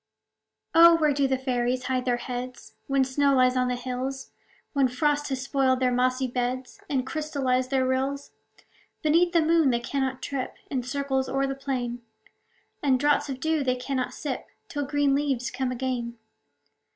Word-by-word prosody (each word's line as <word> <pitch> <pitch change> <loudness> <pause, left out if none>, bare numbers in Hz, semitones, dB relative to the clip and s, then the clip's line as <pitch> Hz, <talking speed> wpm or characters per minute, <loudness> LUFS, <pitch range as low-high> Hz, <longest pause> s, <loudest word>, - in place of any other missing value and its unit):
Oh! 335 +1 +8
where 305 -3 +3
do 275 0 +2
fairies 255 -1 0
hide 255 -1 -1
their 245 -1 +1
heads, 250 0 -6
When 275 -1 +3
snow 275 +1 +2
lies 255 0 +4
on 250 0 +2
the 250 - 0
hills, 255 +2 -4 0.4
When 275 -2 +3
frost 290 +3 0
has 260 -1 -2
spoiled 270 -2 +2
their 255 -1 +2
mossy 255 +1 +1
beds, 250 +4 -3
And 265 -3 0
crystallized 265 -4 -1
their 265 -1 +2
rills? 270 +2 -1 0.7
Beneath 335 +3 +4
the 335 -2 +3
moon 325 -2 +4
they 240 -2 +2
cannot 260 +1 -2
trip 270 -2 -3 0.2
In 260 -3 0
circles 265 +1 -1
o'er 275 +1 +1
the 270 - -2
plain; 250 -3 -3 0.8
And 265 -3 +3
draughts 290 +1 +2
of 265 -1 -4
dew 315 +1 0
they 255 -1 +1
cannot 255 0 -3
sip, 280 -4 -4 0.2
Till 290 -2 -3
green 290 -1 +2
leaves 275 -3 0
come 255 0 -2
again. 245 -2 -3
265 Hz, 165 wpm, -26 LUFS, 255-280 Hz, 0.8 s, Oh